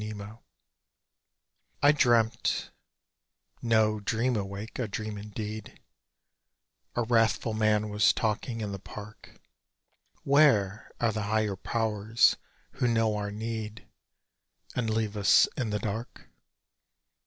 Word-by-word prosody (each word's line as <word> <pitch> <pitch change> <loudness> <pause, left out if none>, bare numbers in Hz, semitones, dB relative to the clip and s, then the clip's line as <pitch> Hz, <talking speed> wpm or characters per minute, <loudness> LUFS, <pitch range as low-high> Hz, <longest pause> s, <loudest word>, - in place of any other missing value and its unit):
IN 105 0 -5
SLEEP 100 0 -7 1.6
I 145 - +8
dreamt 120 -6 +2 0.9
(no 110 -2 +2
"dream" 115 +4 0
awake—a 105 +4 -4
dream 110 +1 -5
indeed) 105 +1 -7 1.2
A 120 - +1
wrathful 115 -1 +2
man 110 -1 +2
was 105 0 +4
talking 115 +1 -2
in 105 -2 -3
the 100 - -5
park: 105 +2 -11 0.8
"Where 135 -9 +3
are 115 -2 +2
the 110 - -3
Higher 110 -2 +1
Powers, 110 +2 +2 0.4
who 125 - -1
know 115 -2 +2
our 105 -1 -3
need 110 +1 -5 0.9
And 120 -3 -1
leave 110 -1 -1
us 100 -2 +5
in 125 -5 -2
the 105 - -1
dark? 110 +3 -5
110 Hz, 110 wpm, -28 LUFS, 105-115 Hz, 1.6 s, I